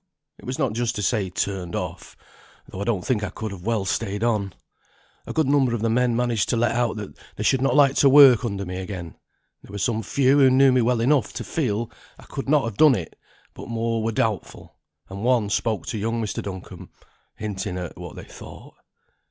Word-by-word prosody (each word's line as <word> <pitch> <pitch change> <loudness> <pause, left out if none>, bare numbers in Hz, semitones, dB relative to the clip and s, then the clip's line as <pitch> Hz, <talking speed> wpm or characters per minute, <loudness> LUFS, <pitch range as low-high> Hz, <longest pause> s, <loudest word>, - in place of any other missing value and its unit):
"It - - -14
was 130 +1 -4
not 135 -7 0
just 120 0 -1
to 105 - -3
say 105 -4 0
turned 90 -1 -3
off, - - -6 0.5
though 95 - -8
I - - -2
don't 105 -6 -1
think 110 -5 0
I 105 - -2
could 110 -2 -6
have 95 +1 -9
well 110 -4 0
stayed 100 +2 -2
on. 105 -4 0 0.8
A - - -4
good 160 - +1
number 135 -3 +2
of 110 - -4
the 115 - +1
men 125 0 +2
managed 120 -3 0
to 120 - +1
let 115 0 +2
out 120 -1 0 0.4
they - - -4
should 135 - +2
not 135 -1 +2
like 140 -2 +5
to 140 - +5
work 135 -4 +8
under 100 -4 -3
me 90 0 -5
again; 90 -3 -6 0.5
there - - -15
were 100 - -6
some 110 +2 0
few 135 +4 +2
who 135 -2 +6
knew 135 +1 +5
me 125 -1 +3
well 120 0 +1
enough 130 -2 +2
to - - -5
feel 120 -7 -2 0.3
I - - -15
could 135 - -6
not 150 -1 +4
have 115 -3 -5
done 150 -4 +6
it, 85 -7 -6 0.4
but - - -10
more 115 0 -1
were 115 +1 -1
doubtful; 110 -3 -3 0.3
and 100 +2 -7
one 120 -4 +2
spoke 110 -4 -1
to 110 - -3
young 115 +3 -1
Mr. 110 -2 -3
Duncombe, 95 -2 -8 0.5
hinting 95 -4 -4
at 90 -2 -6
what - - -9
they - - -9
thought." - - -12
115 Hz, 220 wpm, -23 LUFS, 100-125 Hz, 0.8 s, work